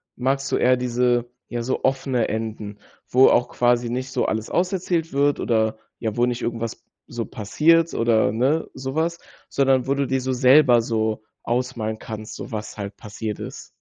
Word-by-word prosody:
magst 135 +2 -1
du - - +2
eher 125 +1 +4
diese, 120 -1 +1 0.2
ja, 120 -1 -3
so 125 +3 -2
offene 130 -2 +1
Enden. 110 -2 -4 0.3
Wo 130 +2 +6
auch 120 0 +3
quasi 120 -1 +2
nicht 130 +2 -3
so - - 0
alles 110 0 -2
aus 180 +2 0
erzählt 170 -4 -1
wird, 145 +1 +2
oder, 110 -2 +1 0.2
ja, 110 -1 -3
wo 120 - +4
nicht 125 0 -2
irgendwas 115 0 -4 0.2
so 120 -2 -5
passiert 155 +10 +2
oder, 115 -3 +2
ne, 135 +8 +1
sowas. 160 +6 -2 0.3
Sondern 135 -2 +2
wo 135 - +1
du 140 -1 -1
dir 130 +1 0
so 130 0 -2
selber 125 -1 +6
so 110 -1 -1 0.2
ausmalen 120 -3 -2
kannst, 110 -1 -7
so - - -8
was 105 0 -6
halt 100 0 -6
passiert 105 0 -6
ist? - - -8
120 Hz, 180 wpm, -23 LUFS, 110-135 Hz, 0.3 s, Wo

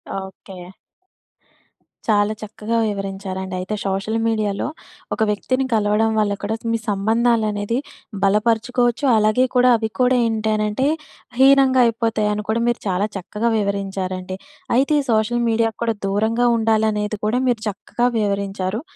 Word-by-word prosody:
Okay. 190 -1 -8 1.4
చాలా 210 -1 +2
చక్కగా 215 +1 -3
వివరించారండైతే 195 -1 -4
social 195 +3 -1
మీడియాలో 215 -2 -1 0.5
ఒక - - -4
వ్యక్తిని 255 +6 0
కలవడం 215 +1 +2
వల్ల 205 -1 +1
కూడా 215 +2 -1 0.2
మీ - - +2
సంబంధాలనేది 220 +1 +1 0.5
బలపరుచుకోవచ్చు 235 +5 +1
అలాగే 215 +4 +3
కూడా 250 0 +5
అవి 220 0 -2
కూడా 250 0 +4
ఏంటనంటే 215 +3 0 0.5
హీనంగా 265 -1 +6
అయిపోతాయని 215 -2 0
కూడా 225 +1 +1
మీరు 240 - +1
చాలా 190 +2 +1
చక్కగా 210 +5 -2
వివరించారండి. 190 -2 -3 0.4
అయితే 275 +4 +3
ఈ - - -6
సోషల్ 225 +2 +1
మీడియాక్కూడా 225 0 0
దూరంగా 220 +5 +1
ఉండాలనేది 215 -1 +1
కూడా 220 +4 +1
మీరు 235 -3 0
చక్కగా 225 +4 -2
వివరించారు. 200 +1 -2
215 Hz, 115 wpm, -20 LUFS, 200-230 Hz, 1.4 s, హీనంగా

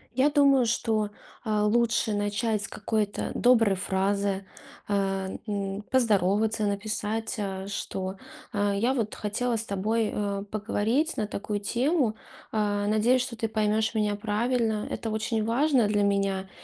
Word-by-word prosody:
Я 265 +3 +4
думаю, 275 -3 +5
что, 220 -2 0 0.3
а, 210 -1 +1
лучше 230 0 +2
начать 205 +1 0
с - - -4
какой-то 210 -1 -2
доброй 230 -5 +4
фразы, 195 +1 0 0.4
а, 195 -1 0 0.2
м, 200 0 -3
поздороваться, 215 -2 +2
написать, 215 +2 -2
а, 195 -2 -4
что, 190 -1 -4 0.4
а, 205 -2 +1
я 235 +6 +1
вот 220 -3 -1
хотела 230 +4 -1
с 225 - -2
тобой, 215 +2 0
а, 200 -1 -2
поговорить 220 +8 0
на 215 - -1
такую 205 0 -3
тему, 245 - +1 0.4
а. 205 -1 0
Надеюсь, 230 +4 +3
что 250 -2 -4
ты 225 0 -2
поймешь 215 +1 +1
меня 210 -2 +1
правильно. 220 +1 0
Это 225 - -3
очень 220 0 -1
важно 250 -1 +3
для 205 0 +1
меня. 195 -1 0
215 Hz, 140 wpm, -27 LUFS, 200-230 Hz, 0.4 s, думаю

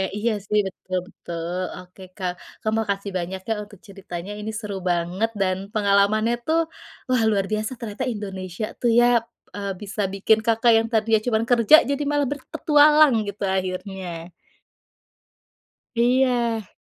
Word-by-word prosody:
iya, 225 +3 0 0.2
sih, 210 0 +2
betul 185 0 -5
betul, 170 +2 -5 0.2
oke, 180 +1 -17 0.2
Kak. 185 -3 -1 0.3
Kak, 215 - -1
makasih 200 -2 -2
banyak, 185 +2 -4
ya, - - +3
untuk 205 -2 -15
ceritanya, 190 -1 -7
ini 215 +1 -4
seru 210 -2 -5
banget, 175 +6 0
dan 185 -1 +1 0.2
pengalamannya, 210 +2 +3
tuh, 325 +1 +2 0.5
wah, 250 -3 +3
luar 200 -3 +1
biasa 215 +2 -1
ternyata 215 +1 -4
Indonesia, 195 -3 -4
tuh, 240 - +1
ya, 240 - +5 0.5
eee, 200 -1 -3
bisa 210 +1 -4
bikin 210 +3 +3
Kakak 230 +1 +4
yang 225 - -1
tadinya 220 -1 +3
cuman 220 -2 +2
kerja 235 +3 +7
jadi 280 +1 0
malah 290 0 +1
berpetualang, 295 +1 +4
gitu, 200 0 -5
akhirnya. 185 -2 -4 1.6
Iya. 240 -2 +2
210 Hz, 140 wpm, -23 LUFS, 190-230 Hz, 1.6 s, kerja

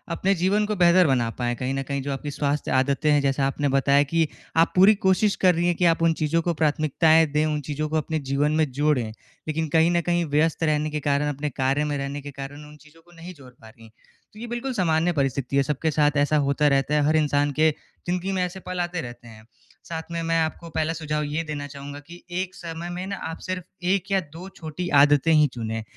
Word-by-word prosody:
अपने 195 +3 +1
जीवन 195 +4 +1
को 210 0 -2
बेहतर 180 -1 +5
बना 125 -4 +1
पाएँ। 120 -1 -1
कहीं 130 +2 -3
न 135 0 -2
कहीं 140 +1 -3
जो 140 +1 -4
आपकी 145 +2 -5
स्वास्थ्य 145 +1 -2
आदतें 140 +3 +1
हैं 145 -1 +4
जैसा 135 0 +1
आपने 145 +1 -1
बताया 140 +1 +3
कि 160 +3 +1 0.3
आप 165 +1 +4
पूरी 195 +4 +7
कोशिश 195 +1 +2
कर 185 -1 +3
रही 170 +1 +1
हैं 175 - +1
कि, 175 - +1
आप 165 -1 +3
उन 165 -1 +4
चीज़ों 160 +1 0
को 170 +1 -1
प्राथमिकताएँ 155 +1 +3
दें 150 +1 +1
उन 150 -1 -1
चीज़ों 150 +2 -4
को 160 - 0
अपने 155 +1 -2
जीवन 140 +1 0
में 155 -2 +2
जोड़ें। 135 -4 0 0.4
लेकिन 160 +1 -1
कहीं 165 +2 +3
न 175 0 +2
कहीं 175 0 0
व्यस्त 155 +3 +1
रहने 155 -1 +1
के 150 0 -3
कारण 145 0 0
अपने 145 +2 -3
कार्य 135 +2 0
में 145 -1 -2
रहने 140 +1 -4
के 145 +1 -8
कारण 140 +2 -8
उन 150 - -14
चीज़ों 155 +2 -20
को 175 - -23
नहीं 170 +2 -10
जोड़ 135 -6 -15
पा 110 -2 -17
रही 115 +1 -18
हैं। 110 - -17 0.4
तो 210 - -13
ये 240 - -6
बिल्कुल 240 +3 -4
सामान्य 170 -4 +1
परिस्थिति 135 -2 -1
है 140 - +4
सबके 150 +3 -1
साथ 150 0 +3
ऐसा 145 +1 +2
होता 145 +1 +2
रहता 140 +1 +1
है, 150 - +3
हर 155 - +2
इंसान 145 -2 +2
के 160 0 +5 0.4
ज़िंदगी 180 +2 -1
में 185 -1 0
ऐसे 180 +1 -5
पल 185 -1 -6
आते 175 -1 -3
रहते 120 -1 -10
हैं। 110 -1 -14 0.4
साथ 160 -1 -5
में 170 0 -3
मैं 165 0 +1
आपको 160 +1 -4
पहला 160 0 -1
सुझाव 150 -2 -3
ये 150 +2 -2
देना 150 -2 -5
चाहूँगा 140 0 -9
कि, 170 +4 -14
एक 185 +1 -3
समय 170 0 -7
में 180 +1 -5
ना 200 - -3
आप 160 - -6
सिर्फ़ 185 -1 -4 0.2
1 190 +1 0
या 195 - +3
2 180 +4 -9
छोटी 165 +2 -6
आदतें 145 +2 +4
ही 150 -1 +5
चुनें। 110 -2 -4
155 Hz, 245 wpm, -24 LUFS, 140-170 Hz, 0.4 s, पूरी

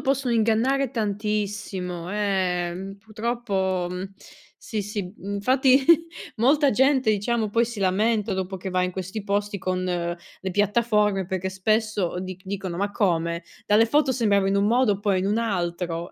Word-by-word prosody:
possono 265 -3 0
ingannare 230 +4 +2
tantissimo, 205 -5 -3
ehm, 190 -2 -1
purtroppo, 210 -4 -2
mhmm, 185 +2 -5 0.4
sì, 215 -2 -4
sì, 200 -2 -5
m 200 +1 -4
fatti 260 +4 +4 0.5
molta 280 +5 +4
gente 265 0 +3
diciamo 215 +1 0
poi 230 +3 +2
si 230 -3 -6
lamenta 210 +2 +1
dopo 190 0 -3
che 190 +1 -6
va 185 0 +1
in 180 - 0
questi 190 +3 -5
posti 205 0 -1
con 185 0 -2
le 175 +1 -4
piattaforme, 210 -1 +2
perché 190 0 -2
spesso 200 -2 0
dic 185 0 -7
dicono: 190 -2 -4
"Ma 200 +2 -1
come, 170 -4 0 0.2
dalle 215 +2 +5
foto 290 +1 +2
sembrava 200 -5 +2
in 200 - +1
un 200 +1 +2
modo 235 -1 +3
e 195 - -9
poi 200 -2 +1
è - - +2
in 190 - -1
un 210 +3 +1
altro." 175 -5 -2
200 Hz, 160 wpm, -24 LUFS, 185-225 Hz, 0.5 s, dalle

